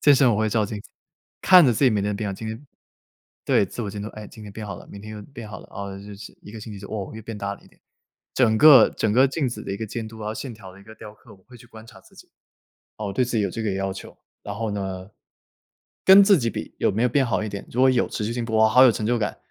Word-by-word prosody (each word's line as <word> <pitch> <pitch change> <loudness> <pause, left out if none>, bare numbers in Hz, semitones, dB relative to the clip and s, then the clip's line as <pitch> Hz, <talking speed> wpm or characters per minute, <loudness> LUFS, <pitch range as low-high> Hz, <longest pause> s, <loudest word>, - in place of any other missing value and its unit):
健 145 - +6
身 130 -2 +4
我 105 - +1
会 110 0 +1
照 110 0 +1
镜 105 0 -6
子， - - -17 0.5
看 185 -2 +8
着 125 - +4
自 115 +5 +1
己 130 - +5
每 105 -2 0
天 100 - -1
的 105 - -2
变 105 0 -3
化， - - -4
今 110 +3 -7
天 115 +7 -8 0.8
对， 100 - +2
自 120 - -6
我 105 - -4
监 100 - -7
督。 105 - -5
哎， 110 -1 -10
今 110 - -13
天 105 - -9
变 105 +1 -8
好 100 - -6
了， - - -13
明 100 - -10
天 110 +1 -9
又 105 - -8
变 120 -1 -11
好 - - -9
了， - - -16
哦， 100 0 -7
就 100 +1 -10
是 100 +1 -11
1 - - -13
个 110 - -9
星 110 0 -9
期 100 - -9
就 100 - -10
哦， 100 -2 -5
又 110 - -8
变 110 0 -8
大 100 0 -4
了 - - -19
一 - - -20
点。 - - -28 0.5
整 115 -4 +2
个 135 -2 +8
整 110 -2 -1
个 130 +4 +4
镜 140 +1 -2
子 120 - -5
的 - - -7
一 100 - -3
个 110 - -4
监 110 +1 -6
督 110 0 -12
啊， 105 0 -4
线 120 +2 -7
条 95 -4 -13
的 95 - -16
一 - - -16
个 110 +2 -14
雕 105 -1 -11
刻， - - -18
我 95 - -24
会 125 -1 -15
去 120 - -16
观 110 -1 -14
察 - - -15
自 - - -23
己。 - - -16 0.7
哦， 105 -2 -4
对 125 - +1
自 120 -2 -2
己 105 - +1
有 - - -1
这 115 - -5
个 105 -3 -1
要 95 0 -2
求。 95 - -11 0.2
然 100 - -7
后 110 0 -3
呢， 95 -1 -5 0.9
跟 195 +1 +8
自 200 0 +6
己 115 -3 -1
比， - - -7
有 - - +2
没 110 +5 -1
有 125 - +3
变 135 +3 +2
好 110 -3 -1
一 105 - -4
点。 100 0 -8
如 120 - -3
果 130 0 +6
有， 125 - +1
持 105 - -4
续 115 - -3
性 120 0 -3
哇， 110 -1 +3
好 125 +4 +6
有 130 - +7
成 110 - -4
就 120 +1 +1
感。 105 -4 -3
110 Hz, 340 characters per minute, -23 LUFS, 100-120 Hz, 0.9 s, 看